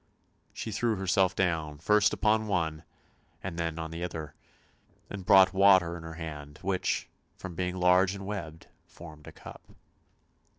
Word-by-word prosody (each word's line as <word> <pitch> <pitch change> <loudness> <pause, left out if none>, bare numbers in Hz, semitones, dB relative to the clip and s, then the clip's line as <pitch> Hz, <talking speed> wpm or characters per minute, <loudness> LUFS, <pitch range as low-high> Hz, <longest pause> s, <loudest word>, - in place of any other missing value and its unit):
She 110 - -6
threw 110 +2 0
herself 95 -1 +1
down, 80 -5 -1
first 105 +6 +3
upon 110 0 +1
one, 80 -5 -1 0.6
and 85 -2 -5
then 85 -1 -2
on 80 -1 -5
the 85 +1 -5
other; 80 -4 -6 0.8
and 100 -2 -6
brought 95 -2 +7
water 95 -3 +5
in 85 - -8
her 80 0 -8
hand, 75 -3 -8
which, 95 0 -1 0.3
from 95 -2 -8
being 90 +1 -3
large 90 +2 +3
and 95 0 -8
webbed, 85 -6 -6 0.2
formed 80 -3 -13
a - - -8
cup. - - -12
90 Hz, 155 wpm, -29 LUFS, 80-95 Hz, 0.8 s, brought